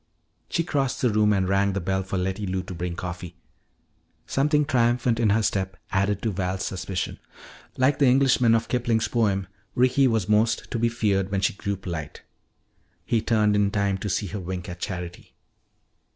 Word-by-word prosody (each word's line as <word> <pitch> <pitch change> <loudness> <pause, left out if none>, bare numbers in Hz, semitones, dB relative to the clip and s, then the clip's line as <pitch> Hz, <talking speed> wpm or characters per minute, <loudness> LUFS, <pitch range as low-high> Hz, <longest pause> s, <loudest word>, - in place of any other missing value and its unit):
She 165 - 0
crossed 140 -6 -1
the 125 - +3
room 105 0 +3
and 95 -2 +1
rang 100 +1 +2
the 100 - -1
bell 95 +1 -1
for 95 0 -4
Letty 95 +2 -2
Lou 95 0 -2
to 90 - -8
bring 85 0 -4
coffee. 90 -1 -6 0.9
Something 150 +2 +2
triumphant 120 -3 +2
in 115 -3 +3
her 110 +2 +3
step 95 -2 -1
added 100 0 0
to 110 - 0
Val's 95 0 -2
suspicion. 95 -1 -4 0.6
Like 130 +2 +2
the 140 - +5
Englishman 125 -3 +4
of 115 0 0
Kipling's 120 -3 +1
poem, 100 -5 +1 0.3
Ricky 130 +2 +4
was 110 -6 0
most 110 +2 +1
to 115 - -1
be 115 +1 +2
feared 100 -5 0
when 100 -1 0
she - - +2
grew 100 0 -3
polite. 85 -6 -6 0.8
He 115 - +1
turned 105 -2 +2
in 100 -1 +3
time 100 -1 0
to 105 - -3
see 100 - 0
her 100 +2 -5
wink 90 0 -5
at 90 0 -7
Charity. 90 -2 -6
100 Hz, 180 wpm, -25 LUFS, 95-115 Hz, 0.9 s, the